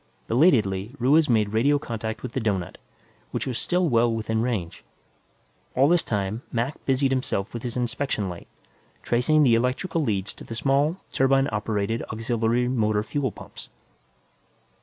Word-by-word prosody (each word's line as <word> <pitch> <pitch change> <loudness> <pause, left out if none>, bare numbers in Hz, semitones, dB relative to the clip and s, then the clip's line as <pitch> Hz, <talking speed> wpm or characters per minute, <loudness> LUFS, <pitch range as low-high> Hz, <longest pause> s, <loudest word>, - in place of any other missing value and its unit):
Belatedly, 115 - +2
Ruiz 145 +5 +3
made 110 -3 +3
radio 140 +7 +3
contact 115 -5 -5
with 125 - -5
the 130 - -2
doughnut, 100 -6 -2 0.5
which - - -3
was 125 -3 -2
still 180 0 +1
well 120 -3 +3
within 110 0 -1
range. 110 -9 -3 0.9
All 135 +2 +5
this 175 +1 +4
time, 105 +1 -2
Mac 120 +5 -2
busied 135 0 +2
himself 125 -6 -1
with 120 - -5
his 120 0 -4
inspection 120 -3 -1
light, 90 -2 -8 0.6
tracing 135 +6 +3
the 125 -4 +5
electrical 130 +9 0
leads 105 -8 -1
to - - -12
the 115 - -7
small, 140 +7 +1
turbine 135 +1 +3
operated 105 +1 -1
auxiliary 115 +2 0
motor 110 -4 +1
fuel 130 +3 -2
pumps. - - -11
120 Hz, 150 wpm, -25 LUFS, 110-135 Hz, 0.9 s, All